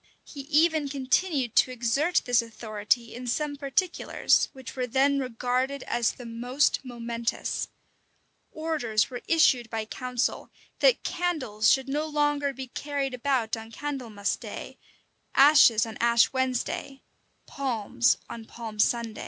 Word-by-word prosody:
He 290 Hz, -, -12 dB
even 310 Hz, -1 st, +3 dB
continued 270 Hz, -, 0 dB
to -, -, +5 dB
exert 255 Hz, +8 st, +1 dB
this 245 Hz, -1 st, +3 dB
authority 225 Hz, 0 st, -2 dB
in 245 Hz, +1 st, -7 dB
some 290 Hz, +4 st, -1 dB
particulars, 285 Hz, +6 st, +1 dB
which 265 Hz, -2 st, -10 dB
were 255 Hz, -1 st, -2 dB
then 275 Hz, +3 st, +2 dB
regarded 255 Hz, +2 st, -2 dB
as 235 Hz, -2 st, 0 dB
the 245 Hz, -, -11 dB
most 245 Hz, +4 st, 0 dB
momentous. 235 Hz, -2 st, -3 dB, 0.8 s
Orders 295 Hz, -9 st, -1 dB
were 245 Hz, -, -6 dB
issued 260 Hz, -8 st, +3 dB
by 220 Hz, -1 st, -3 dB
council, 250 Hz, +2 st, -2 dB, 0.3 s
that -, -, +4 dB
candles 265 Hz, -12 st, 0 dB
should 265 Hz, 0 st, +3 dB
no 295 Hz, +3 st, -1 dB
longer 295 Hz, -1 st, +1 dB
be 265 Hz, 0 st, -7 dB
carried 280 Hz, -1 st, -3 dB
about 250 Hz, -3 st, 0 dB
on 225 Hz, 0 st, -9 dB
Candlemas 235 Hz, -7 st, -3 dB
day, -, -, -9 dB, 0.6 s
ashes 270 Hz, -5 st, +7 dB
on 225 Hz, -1 st, -8 dB
Ash 235 Hz, +1 st, +4 dB
Wednesday, 260 Hz, +1 st, -2 dB, 0.4 s
palms 240 Hz, -3 st, 0 dB
on 230 Hz, -1 st, -8 dB
Palm 220 Hz, -2 st, -9 dB
Sunday. 230 Hz, 0 st, +1 dB
255 Hz, 130 wpm, -27 LUFS, 230-285 Hz, 0.8 s, ashes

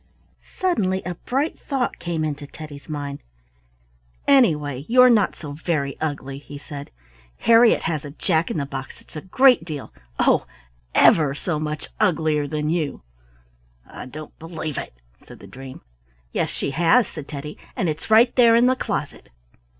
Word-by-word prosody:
Suddenly 195 Hz, -, 0 dB
a 180 Hz, -, -3 dB
bright 270 Hz, -, -2 dB
thought 270 Hz, -4 st, -2 dB
came 165 Hz, -2 st, -2 dB
into 145 Hz, -1 st, -4 dB
Teddy's 150 Hz, 0 st, -11 dB
mind. 145 Hz, -2 st, -5 dB, 1.1 s
"Anyway, 150 Hz, -, +3 dB
you're 250 Hz, +1 st, +7 dB
not 210 Hz, -4 st, +3 dB
so 150 Hz, -3 st, -8 dB
very 145 Hz, -2 st, -2 dB
ugly," 140 Hz, -3 st, -3 dB
he 145 Hz, 0 st, -10 dB
said. 145 Hz, 0 st, -9 dB, 0.5 s
"Harriet 230 Hz, 0 st, +5 dB
has 155 Hz, -3 st, -2 dB
a 145 Hz, -, -7 dB
Jack 160 Hz, +2 st, 0 dB
in -, -, -2 dB
the 140 Hz, -, -1 dB
box 135 Hz, -1 st, -7 dB
that's -, -, -21 dB
a 155 Hz, -, -5 dB
great 250 Hz, -, +4 dB
deal—oh! 65 Hz, -, -1 dB, 0.5 s
ever 145 Hz, -4 st, +5 dB
so 155 Hz, 0 st, -2 dB
much 150 Hz, 0 st, -4 dB
uglier 155 Hz, -4 st, +1 dB
than 150 Hz, 0 st, -2 dB
you." 160 Hz, -, -2 dB, 0.8 s
"I -, -, -10 dB
don't 155 Hz, +3 st, -10 dB
believe 160 Hz, -2 st, -5 dB
it," -, -, -8 dB, 0.3 s
said -, -, -12 dB
the -, -, -14 dB
dream. 130 Hz, 0 st, -10 dB, 0.5 s
"Yes, -, -, -1 dB
she -, -, -3 dB
has," 175 Hz, -, +4 dB
said 150 Hz, -3 st, -9 dB
Teddy; 150 Hz, 0 st, -7 dB, 0.2 s
"and 185 Hz, -, 0 dB
it's 155 Hz, +4 st, -4 dB
right 230 Hz, +3 st, +5 dB
there 235 Hz, -2 st, +6 dB
in 235 Hz, +1 st, +5 dB
the 255 Hz, +1 st, +4 dB
closet." 200 Hz, -, -4 dB
155 Hz, 160 wpm, -22 LUFS, 145-190 Hz, 1.1 s, you're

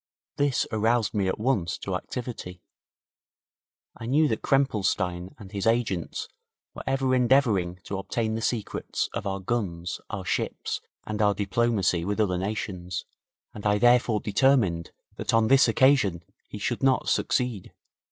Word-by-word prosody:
This 140 Hz, -2 st, +2 dB
aroused 110 Hz, 0 st, +1 dB
me 100 Hz, -3 st, +1 dB
at 95 Hz, -, -1 dB
once 105 Hz, -7 st, 0 dB
to -, -, -5 dB
activity. 115 Hz, -8 st, -6 dB, 1.3 s
I 115 Hz, -, -7 dB
knew 150 Hz, +5 st, +4 dB
that 110 Hz, -, -1 dB
Krempelstein 95 Hz, -9 st, 0 dB
and 100 Hz, -3 st, -12 dB
his 100 Hz, +1 st, -2 dB
agents 115 Hz, -7 st, 0 dB, 0.5 s
were -, -, -7 dB
ever 135 Hz, -1 st, +1 dB
endeavouring 120 Hz, -9 st, +3 dB
to 100 Hz, -, -4 dB
obtain 110 Hz, +3 st, -2 dB
the 115 Hz, -, -2 dB
secrets 115 Hz, -2 st, -2 dB
of 100 Hz, -, -3 dB
our 95 Hz, 0 st, -2 dB
guns, 90 Hz, -5 st, -3 dB
our -, -, -5 dB
ships, -, -, -2 dB, 0.2 s
and 105 Hz, 0 st, -3 dB
our 105 Hz, -1 st, +3 dB
diplomacy 100 Hz, -3 st, +1 dB
with 105 Hz, +4 st, -2 dB
other 90 Hz, -4 st, +1 dB
nations, 95 Hz, -3 st, -4 dB, 0.5 s
and 105 Hz, -, -9 dB
I 105 Hz, 0 st, +3 dB
therefore 120 Hz, -1 st, +4 dB
determined 105 Hz, -7 st, +2 dB, 0.3 s
that -, -, 0 dB
on 115 Hz, -1 st, +3 dB
this 135 Hz, +1 st, +6 dB
occasion 115 Hz, -11 st, +3 dB, 0.2 s
he -, -, -8 dB
should 115 Hz, +4 st, -2 dB
not 135 Hz, -1 st, +2 dB
succeed. 125 Hz, -7 st, 0 dB
110 Hz, 145 wpm, -26 LUFS, 95-120 Hz, 1.3 s, this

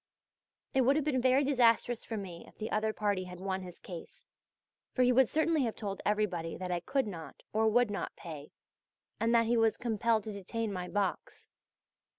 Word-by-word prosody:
It 265 Hz, -, +4 dB
would 265 Hz, +3 st, +4 dB
have 305 Hz, -1 st, +1 dB
been 265 Hz, -4 st, +1 dB
very 260 Hz, +2 st, +4 dB
disastrous 245 Hz, -3 st, +3 dB
for 225 Hz, -, -4 dB
me 180 Hz, -4 st, -7 dB
if -, -, -18 dB
the 215 Hz, -, -4 dB
other 215 Hz, +1 st, +1 dB
party 205 Hz, -3 st, -1 dB
had 180 Hz, -1 st, -9 dB
won 190 Hz, 0 st, -2 dB
his 180 Hz, -2 st, -9 dB
case, 175 Hz, -3 st, -10 dB, 0.7 s
for 255 Hz, -, +4 dB
he 250 Hz, -, +5 dB
would 255 Hz, -1 st, +5 dB
certainly 315 Hz, 0 st, +2 dB
have 225 Hz, -, -2 dB
told 200 Hz, -3 st, -4 dB
everybody 190 Hz, -6 st, 0 dB
that 185 Hz, -1 st, -4 dB
I 175 Hz, -, 0 dB
could 265 Hz, +9 st, 0 dB
not, 170 Hz, -6 st, -8 dB
or 220 Hz, +1 st, +3 dB
would 235 Hz, 0 st, +3 dB
not, 200 Hz, -, -4 dB
pay, 155 Hz, -4 st, -8 dB, 0.7 s
and 230 Hz, +1 st, +2 dB
that 230 Hz, 0 st, +5 dB
he 235 Hz, +1 st, +2 dB
was 225 Hz, -1 st, +3 dB
compelled 230 Hz, -1 st, +1 dB
to 215 Hz, -, -5 dB
detain 205 Hz, +2 st, -3 dB
my 180 Hz, -1 st, -4 dB
box. 200 Hz, 0 st, -3 dB
215 Hz, 195 wpm, -32 LUFS, 190-245 Hz, 0.7 s, he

